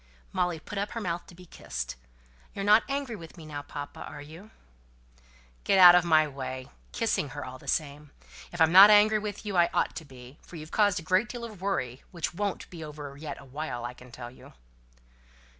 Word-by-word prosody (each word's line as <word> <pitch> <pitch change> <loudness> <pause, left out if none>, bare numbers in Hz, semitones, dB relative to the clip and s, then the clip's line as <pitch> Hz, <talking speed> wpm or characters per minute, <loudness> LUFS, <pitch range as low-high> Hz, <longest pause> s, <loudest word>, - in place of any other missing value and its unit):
Molly 175 -2 0
put 200 +5 -6
up 205 - -3
her 230 - -3
mouth 175 -5 -3
to 175 - -14
be 180 +1 -14
kissed. - - -6 0.6
"You're 195 - -3
not 210 +2 +7
angry 275 -4 -2
with 165 -2 -12
me 160 - -11
now, 150 -2 -6
papa, 145 0 -8
are 150 - -8
you?" 160 +8 -12 1.1
"Get - - +3
out 180 -2 +10
of 180 -1 +5
my 155 -3 +4
way" 130 -1 -6 0.2
(kissing 225 - -1
her - - -4
all 130 0 -9
the - - -16
same). 150 -1 -2 0.4
"If 175 - -8
I'm 160 0 +5
not 195 +3 +10
angry 215 +1 +6
with 210 0 -6
you, 205 -2 -3
I 175 -1 +4
ought - - +1
to 165 - -6
be; 130 0 -14
for - - -14
you've 155 0 -9
caused 205 -4 +3
a - - -10
great 185 +7 +2
deal 240 -1 -6
of 215 -5 -9
worry, 135 -11 -2
which 170 -1 -4
won't 200 +2 -3
be 170 -3 -8
over 145 -2 -8
yet 145 0 -7
awhile, 140 -2 -6
I 120 - -5
can 125 0 -15
tell 120 0 -9
you." 130 - -16
165 Hz, 210 wpm, -28 LUFS, 145-200 Hz, 1.1 s, out